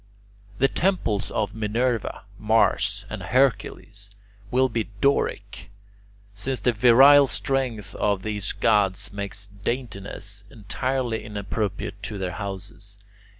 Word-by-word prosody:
The 135 Hz, -, +4 dB
temples 155 Hz, -, 0 dB
of 105 Hz, -2 st, -2 dB
Minerva, 115 Hz, +2 st, -1 dB, 0.2 s
Mars, 105 Hz, -2 st, +2 dB
and 105 Hz, 0 st, -6 dB
Hercules, 110 Hz, -2 st, 0 dB, 0.4 s
will 130 Hz, +3 st, +3 dB
be 115 Hz, -3 st, -2 dB
Doric, 140 Hz, -6 st, 0 dB, 0.6 s
since 125 Hz, +5 st, -3 dB
the 125 Hz, +5 st, +2 dB
virile 135 Hz, +5 st, +7 dB
strength 125 Hz, -8 st, -2 dB
of 100 Hz, -2 st, 0 dB
these 105 Hz, -2 st, -2 dB
gods 100 Hz, -1 st, +1 dB
makes 100 Hz, -1 st, -4 dB, 0.2 s
daintiness 105 Hz, -4 st, -4 dB
entirely 120 Hz, +2 st, -2 dB
inappropriate 105 Hz, -1 st, -4 dB
to 110 Hz, -1 st, -5 dB
their 95 Hz, -2 st, -3 dB
houses. 100 Hz, +2 st, -5 dB
105 Hz, 110 wpm, -24 LUFS, 100-125 Hz, 0.6 s, virile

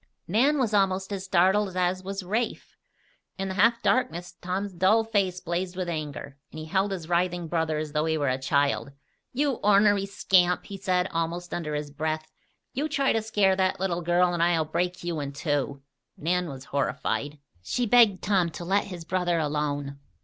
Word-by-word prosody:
Nan 255 Hz, -, +3 dB
was 240 Hz, -6 st, 0 dB
almost 195 Hz, -1 st, +1 dB
as 190 Hz, -1 st, -4 dB
startled 190 Hz, +1 st, +2 dB
as 185 Hz, +1 st, 0 dB
was 195 Hz, 0 st, -4 dB
Rafe. 220 Hz, +6 st, -3 dB, 0.6 s
In 195 Hz, 0 st, -3 dB
the -, -, -3 dB
half 230 Hz, +5 st, +3 dB
darkness 180 Hz, -8 st, 0 dB
Tom's 190 Hz, +2 st, -3 dB
dull 190 Hz, +6 st, +3 dB
face 200 Hz, -5 st, 0 dB
blazed 180 Hz, +1 st, -3 dB
with 185 Hz, -1 st, -3 dB
anger, 145 Hz, -4 st, -5 dB
and -, -, -11 dB
he 155 Hz, -, -6 dB
held 195 Hz, +4 st, 0 dB
his 175 Hz, -5 st, -5 dB
writhing 175 Hz, 0 st, 0 dB
brother 160 Hz, -1 st, 0 dB
as 155 Hz, -1 st, -4 dB
though 150 Hz, +1 st, 0 dB
he 160 Hz, 0 st, +1 dB
were 145 Hz, -2 st, 0 dB
a 130 Hz, 0 st, 0 dB
child. 140 Hz, +1 st, 0 dB, 0.4 s
"You 275 Hz, 0 st, 0 dB
ornery 205 Hz, -1 st, +4 dB
scamp!" 180 Hz, -2 st, +2 dB
he 200 Hz, -, -7 dB
said, 185 Hz, -1 st, +1 dB
almost 165 Hz, +2 st, -3 dB
under 150 Hz, -3 st, -3 dB
his 150 Hz, -1 st, -4 dB
breath. 155 Hz, +1 st, -3 dB, 0.4 s
"You 290 Hz, +4 st, -2 dB
try 275 Hz, -2 st, +2 dB
to 225 Hz, -, +1 dB
scare 205 Hz, -3 st, +2 dB
that 190 Hz, -1 st, +1 dB
little 180 Hz, -2 st, -1 dB
girl, 175 Hz, +1 st, +2 dB
and 170 Hz, -, -1 dB
I'll 170 Hz, -2 st, +3 dB
break 175 Hz, +3 st, -2 dB
you 170 Hz, -2 st, -2 dB
in 140 Hz, -1 st, -4 dB
two!" 140 Hz, -1 st, -2 dB, 0.3 s
Nan 180 Hz, +2 st, 0 dB
was 135 Hz, -1 st, -8 dB
horrified. 140 Hz, +1 st, -2 dB, 0.2 s
She 245 Hz, -, -1 dB
begged 225 Hz, -4 st, +5 dB
Tom 185 Hz, -4 st, +2 dB
to 170 Hz, -, -7 dB
let 195 Hz, +3 st, +1 dB
his 175 Hz, -4 st, -8 dB
brother 175 Hz, -1 st, 0 dB
alone. 145 Hz, -2 st, -2 dB
180 Hz, 185 wpm, -26 LUFS, 155-195 Hz, 0.6 s, begged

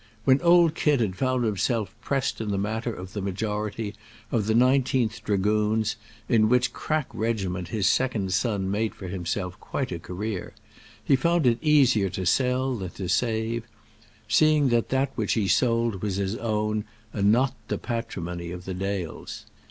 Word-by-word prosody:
When 130 Hz, 0 st, +5 dB
old 170 Hz, -2 st, +5 dB
Kit 150 Hz, -4 st, +2 dB
had 105 Hz, -6 st, 0 dB
found 130 Hz, +2 st, 0 dB
himself 110 Hz, +1 st, 0 dB
pressed 135 Hz, 0 st, -1 dB
in 110 Hz, -, -3 dB
that 100 Hz, -, 0 dB
matter 110 Hz, +4 st, -2 dB
of 95 Hz, -3 st, -8 dB
the 105 Hz, -, -3 dB
majority 105 Hz, +2 st, -3 dB, 0.4 s
of 110 Hz, -3 st, 0 dB
the 110 Hz, -, +2 dB
Nineteenth 125 Hz, -2 st, +2 dB
Dragoons, 105 Hz, +2 st, +1 dB, 0.3 s
in 110 Hz, -3 st, +4 dB
which 125 Hz, 0 st, +2 dB
crack 155 Hz, -2 st, -1 dB
regiment 95 Hz, -6 st, -2 dB
his 105 Hz, 0 st, -1 dB
second 110 Hz, -8 st, +1 dB
son 100 Hz, -2 st, 0 dB
made 110 Hz, +2 st, -1 dB
for 95 Hz, -, -8 dB
himself 90 Hz, 0 st, -3 dB
quite 135 Hz, -, -3 dB
a 85 Hz, -, -3 dB
career, 95 Hz, +3 st, -5 dB, 0.5 s
he 135 Hz, -, +4 dB
found 170 Hz, +3 st, +2 dB
it 120 Hz, -1 st, +3 dB
easier 130 Hz, -10 st, +4 dB
to 95 Hz, 0 st, -4 dB
sell 130 Hz, +5 st, +2 dB
than 95 Hz, -5 st, -5 dB
to 95 Hz, +1 st, -6 dB
save 110 Hz, +3 st, 0 dB, 0.6 s
seeing 150 Hz, +4 st, +4 dB
that 120 Hz, -1 st, +1 dB
that 135 Hz, +1 st, +1 dB
which 110 Hz, -3 st, 0 dB
he 105 Hz, -4 st, +1 dB
sold 115 Hz, 0 st, +2 dB
was 105 Hz, -3 st, -1 dB
his 100 Hz, +1 st, -1 dB
own 105 Hz, -2 st, -1 dB, 0.3 s
and 100 Hz, 0 st, +3 dB
not 130 Hz, +3 st, +3 dB
the -, -, -1 dB
patrimony 90 Hz, -8 st, -4 dB
of 90 Hz, +1 st, -7 dB
the 95 Hz, -, -4 dB
Dales. 95 Hz, -2 st, -4 dB
110 Hz, 165 wpm, -26 LUFS, 100-125 Hz, 0.6 s, When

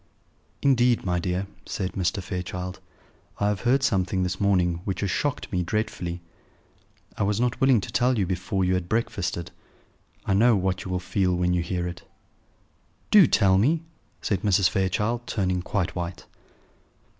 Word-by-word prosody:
"Indeed, 125 Hz, -4 st, +3 dB
my 90 Hz, -1 st, +1 dB
dear," 90 Hz, +2 st, -1 dB, 0.2 s
said 95 Hz, -2 st, -3 dB
Mr. 95 Hz, +1 st, -1 dB
Fairchild, 90 Hz, 0 st, -5 dB, 0.6 s
"I 100 Hz, -, +2 dB
have 105 Hz, -2 st, -1 dB
heard 130 Hz, +3 st, +2 dB
something 95 Hz, -5 st, +1 dB
this 90 Hz, +2 st, -3 dB
morning 90 Hz, -4 st, +2 dB
which 95 Hz, -2 st, -3 dB
has 100 Hz, -3 st, 0 dB
shocked 145 Hz, +7 st, -2 dB
me 90 Hz, -, 0 dB
dreadfully. 90 Hz, -2 st, -3 dB, 1.0 s
I -, -, -4 dB
was 100 Hz, +1 st, +1 dB
not 125 Hz, -1 st, 0 dB
willing 130 Hz, -3 st, +5 dB
to -, -, -7 dB
tell 125 Hz, 0 st, +2 dB
you 100 Hz, -, +2 dB
before 95 Hz, +1 st, -1 dB
you 90 Hz, -, +2 dB
had 90 Hz, -1 st, -2 dB
breakfasted. 95 Hz, -6 st, -2 dB, 0.7 s
I 100 Hz, -, +1 dB
know 115 Hz, +4 st, +5 dB
what 95 Hz, -1 st, -1 dB
you -, -, -5 dB
will 90 Hz, 0 st, -1 dB
feel 90 Hz, 0 st, 0 dB
when 90 Hz, 0 st, +1 dB
you 90 Hz, -, +1 dB
hear 90 Hz, +1 st, -2 dB
it." 85 Hz, -, -7 dB, 1.1 s
"Do 200 Hz, -7 st, +8 dB
tell 95 Hz, -3 st, +4 dB
me," 155 Hz, +9 st, +2 dB, 0.4 s
said 100 Hz, -, 0 dB
Mrs. 100 Hz, -3 st, +3 dB
Fairchild, 105 Hz, +6 st, -1 dB
turning 95 Hz, -3 st, 0 dB
quite 90 Hz, -1 st, -2 dB
white. 85 Hz, -1 st, -5 dB
95 Hz, 165 wpm, -25 LUFS, 90-105 Hz, 1.1 s, Do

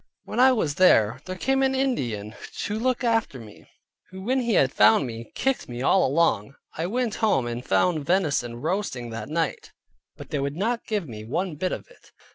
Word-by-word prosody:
When -, -, -5 dB
I 260 Hz, +1 st, +7 dB
was 190 Hz, -, 0 dB
there, 115 Hz, -, +5 dB
there 185 Hz, -, -5 dB
came 270 Hz, +8 st, +1 dB
an 265 Hz, 0 st, +2 dB
Indian 120 Hz, -, -1 dB, 0.3 s
to 210 Hz, +1 st, -2 dB
look 255 Hz, +2 st, 0 dB
after 225 Hz, -, 0 dB
me, 110 Hz, -3 st, -14 dB, 0.4 s
who 190 Hz, 0 st, -9 dB
when 260 Hz, +5 st, +1 dB
he 235 Hz, -4 st, 0 dB
had 130 Hz, -1 st, +4 dB
found 110 Hz, +6 st, +5 dB
me, 115 Hz, -2 st, -8 dB
kicked 265 Hz, -, -1 dB
me 120 Hz, +1 st, -5 dB
all 190 Hz, -, +4 dB
along. 135 Hz, -6 st, +1 dB, 0.2 s
I 165 Hz, +2 st, -2 dB
went 240 Hz, +2 st, -1 dB
home 200 Hz, -, +2 dB
and 120 Hz, +1 st, -4 dB
found 155 Hz, -, +1 dB
venison 150 Hz, -10 st, +1 dB
roasting 155 Hz, -, -2 dB
that 115 Hz, +1 st, -6 dB
night, 165 Hz, +1 st, -2 dB, 0.4 s
but -, -, -11 dB
they 145 Hz, -, -1 dB
would 140 Hz, +1 st, -2 dB
not 230 Hz, +5 st, -1 dB
give 205 Hz, -6 st, -2 dB
me 110 Hz, -3 st, -8 dB
one 165 Hz, -, -2 dB
bit 180 Hz, +5 st, -2 dB
of -, -, -5 dB
it. -, -, -21 dB
165 Hz, 200 wpm, -25 LUFS, -, 0.4 s, I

